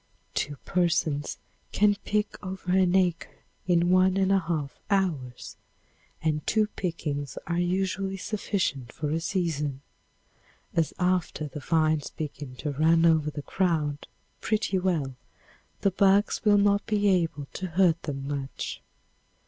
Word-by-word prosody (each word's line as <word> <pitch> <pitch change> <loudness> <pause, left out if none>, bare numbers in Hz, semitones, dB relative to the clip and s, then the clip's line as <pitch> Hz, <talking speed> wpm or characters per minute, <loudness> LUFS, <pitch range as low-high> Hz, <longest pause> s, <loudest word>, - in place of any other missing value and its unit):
Two 145 - -1
persons 160 -4 0 0.3
can 205 0 +4
pick 210 0 -1
over 185 -1 -4
an 185 -1 +4
acre 180 -3 0 0.2
in 175 0 +3
one 185 +1 +4
and 195 0 +2
a 195 - +5
half 160 -5 -3
hours, 160 -11 -1 0.7
and 155 -1 +1
two 215 -1 +3
pickings 145 -6 -3
are 170 0 -1
usually 190 +2 -1
sufficient 185 - -2
for 150 -2 -3
a 160 - +1
season, 155 -6 -2 0.9
as 165 -2 +1
after 180 -4 0
the 145 +1 -7
vines 155 0 +1
begin 145 -4 -6
to 145 +4 -3
run 165 +3 +4
over 160 -2 +4
the 145 -1 -6
ground 155 -6 0 0.3
pretty 215 -3 0
well 165 -8 0 0.7
the 200 - +3
bugs 200 +2 +3
will 210 -2 +5
not 200 0 +3
be 210 -2 +2
able 165 -6 +1
to 190 - -4
hurt 170 -1 +3
them 135 -2 -5
much. 140 -2 -4
170 Hz, 135 wpm, -27 LUFS, 150-190 Hz, 0.9 s, a